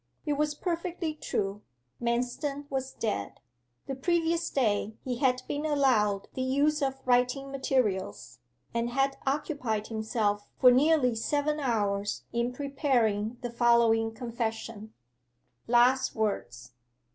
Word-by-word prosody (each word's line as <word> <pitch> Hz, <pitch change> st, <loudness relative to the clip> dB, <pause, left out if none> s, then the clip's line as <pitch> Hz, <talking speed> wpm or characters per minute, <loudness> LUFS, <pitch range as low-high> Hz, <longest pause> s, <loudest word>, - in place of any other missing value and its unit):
It 295 Hz, -, +1 dB
was 295 Hz, +1 st, 0 dB
perfectly 340 Hz, -1 st, -2 dB
true: 205 Hz, -8 st, -3 dB, 0.4 s
Manston 250 Hz, +5 st, -1 dB
was 265 Hz, -1 st, -2 dB
dead. 155 Hz, -, -3 dB, 0.5 s
The 270 Hz, -, -4 dB
previous 335 Hz, +4 st, 0 dB
day 215 Hz, -4 st, 0 dB
he 250 Hz, -2 st, -2 dB
had 255 Hz, -2 st, +2 dB
been 290 Hz, +1 st, -2 dB
allowed 250 Hz, -10 st, +2 dB
the 260 Hz, -, -3 dB
use 285 Hz, +4 st, +2 dB
of 270 Hz, -1 st, 0 dB
writing 250 Hz, +2 st, +2 dB
materials, 210 Hz, -, -1 dB, 0.3 s
and 235 Hz, 0 st, 0 dB
had 270 Hz, +2 st, +1 dB
occupied 265 Hz, -7 st, -1 dB
himself 220 Hz, -2 st, -1 dB
for 250 Hz, -, +8 dB
nearly 270 Hz, -1 st, +4 dB
seven 290 Hz, +6 st, 0 dB
hours 205 Hz, -6 st, -1 dB
in 235 Hz, +1 st, 0 dB
preparing 250 Hz, -5 st, 0 dB
the 245 Hz, -1 st, -4 dB
following 235 Hz, -2 st, +3 dB
confession: 225 Hz, -2 st, -4 dB, 0.8 s
'LAST 245 Hz, +3 st, +4 dB
WORDS. 120 Hz, -, -3 dB
250 Hz, 120 wpm, -29 LUFS, 220-280 Hz, 0.8 s, for